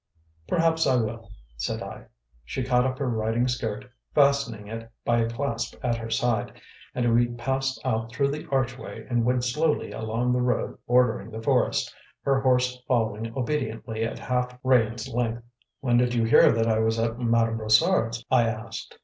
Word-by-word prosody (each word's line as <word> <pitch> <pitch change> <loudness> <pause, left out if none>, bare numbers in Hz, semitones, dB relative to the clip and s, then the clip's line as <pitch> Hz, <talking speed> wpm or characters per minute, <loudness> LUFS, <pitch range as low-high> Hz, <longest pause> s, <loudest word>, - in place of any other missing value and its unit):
"Perhaps 165 -1 +2
I 130 - +4
will," 115 -1 -2 0.3
said - - -3
I. - - -9 0.4
She 125 - -4
caught 125 0 +2
up 130 -1 -3
her 140 - -2
riding 115 +1 0
skirt, 115 -4 -3 0.3
fastening 140 -7 +2
it 115 +1 -7 0.2
by 120 0 +3
a 115 0 +1
clasp 115 0 -3
at 120 -1 +1
her 115 0 -6
side, 115 -1 0 0.4
and 120 -2 +2
we 120 +1 +4
passed 130 +3 -2
out 115 -2 -1
through 140 +2 +1
the 150 +3 -6
archway 130 -2 -2
and 120 -2 +1
went 125 0 +1
slowly 150 +6 0
along 115 +3 -1
the 125 - +1
road 125 0 -1
bordering 120 -3 +2
the 110 0 -7
forest, - - +1 0.3
her 135 -1 +2
horse 125 -1 +2
following 115 -3 0
obediently 115 -5 -2
at 115 - -3
half 125 0 -2
rein's 120 -2 +2
length. 120 -1 -2 0.4
"When 120 -2 +2
did 125 0 +2
you 115 - +2
hear 115 - +6
that 115 0 +1
I 110 -1 +2
was 110 0 +1
at 115 +1 -1
Madame 115 -1 +2
Brossard's?" 115 - +2
I 120 -3 +4
asked. 110 0 -6
120 Hz, 175 wpm, -26 LUFS, 115-130 Hz, 0.4 s, hear